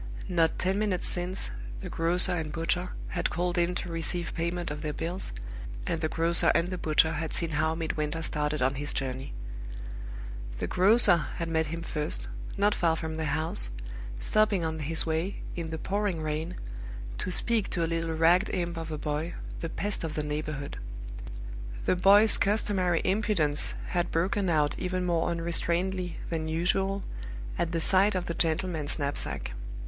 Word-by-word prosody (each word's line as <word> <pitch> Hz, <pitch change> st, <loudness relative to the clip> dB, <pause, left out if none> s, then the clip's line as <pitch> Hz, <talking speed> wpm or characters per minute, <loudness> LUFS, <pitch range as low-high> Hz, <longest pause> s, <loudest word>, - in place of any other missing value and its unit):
Not 165 Hz, -3 st, +2 dB
ten 190 Hz, +2 st, +1 dB
minutes 205 Hz, -4 st, 0 dB
since, 180 Hz, +1 st, 0 dB, 0.3 s
the -, -, -6 dB
grocer 175 Hz, +3 st, +3 dB
and 160 Hz, -4 st, -2 dB
butcher 175 Hz, +3 st, 0 dB, 0.2 s
had -, -, -1 dB
called 175 Hz, 0 st, -1 dB
in 175 Hz, +1 st, +1 dB
to 175 Hz, -1 st, -3 dB
receive 165 Hz, +1 st, -2 dB
payment 170 Hz, 0 st, -2 dB
of 150 Hz, 0 st, -5 dB
their 150 Hz, -1 st, -3 dB
bills, 170 Hz, +5 st, 0 dB, 0.5 s
and 165 Hz, -, -1 dB
the 155 Hz, -, 0 dB
grocer 165 Hz, +1 st, +5 dB
and 175 Hz, +2 st, +2 dB
the 185 Hz, -, -3 dB
butcher 160 Hz, +1 st, +4 dB
had 160 Hz, 0 st, -2 dB
seen 170 Hz, -1 st, +2 dB
how 160 Hz, +1 st, +1 dB
Midwinter 160 Hz, -1 st, -2 dB
started 150 Hz, -2 st, 0 dB
on 130 Hz, +1 st, +2 dB
his 145 Hz, -, -2 dB
journey. 130 Hz, 0 st, -3 dB, 1.3 s
The -, -, -2 dB
grocer 200 Hz, 0 st, +6 dB, 0.2 s
had 165 Hz, 0 st, -3 dB
met 160 Hz, -1 st, +1 dB
him 165 Hz, +2 st, -5 dB
first, 150 Hz, -2 st, -1 dB, 0.3 s
not 205 Hz, +1 st, +3 dB
far 165 Hz, -4 st, +2 dB
from 160 Hz, -1 st, -4 dB
the 160 Hz, -, -1 dB
house, 145 Hz, -, +3 dB, 0.5 s
stopping 210 Hz, -, +2 dB
on 160 Hz, 0 st, -2 dB
his 155 Hz, +2 st, +2 dB
way, 165 Hz, +4 st, -2 dB
in 170 Hz, -2 st, -4 dB
the 160 Hz, -, -4 dB
pouring 195 Hz, -2 st, -1 dB
rain, 155 Hz, +3 st, -2 dB, 0.6 s
to -, -, -2 dB
speak 220 Hz, +3 st, +1 dB
to 170 Hz, -, 0 dB
a -, -, +3 dB
little 165 Hz, 0 st, -1 dB
ragged 170 Hz, +5 st, +4 dB
imp 170 Hz, -1 st, -2 dB
of 165 Hz, -1 st, -5 dB
a 155 Hz, -, -3 dB
boy, 150 Hz, +3 st, -3 dB, 0.2 s
the 165 Hz, -, -4 dB
pest 205 Hz, +3 st, -2 dB
of 160 Hz, -2 st, -3 dB
the 150 Hz, -, -1 dB
neighborhood. 150 Hz, -1 st, -4 dB, 1.1 s
The -, -, +3 dB
boy's 200 Hz, +4 st, +6 dB
customary 195 Hz, -4 st, +2 dB
impudence 185 Hz, -7 st, +2 dB
had 175 Hz, -1 st, 0 dB
broken 185 Hz, +3 st, 0 dB
out 150 Hz, -3 st, +2 dB
even 185 Hz, 0 st, -1 dB
more 170 Hz, -2 st, +1 dB
unrestrainedly 170 Hz, +2 st, 0 dB, 0.2 s
than 160 Hz, -1 st, -2 dB
usual 190 Hz, +4 st, +1 dB, 0.6 s
at 170 Hz, -1 st, 0 dB
the 165 Hz, -, 0 dB
sight 195 Hz, +4 st, +5 dB
of 180 Hz, -1 st, -1 dB
the 170 Hz, -, -2 dB
gentleman's 160 Hz, -2 st, 0 dB
knapsack. 140 Hz, -, -2 dB
165 Hz, 170 wpm, -28 LUFS, 160-180 Hz, 1.3 s, grocer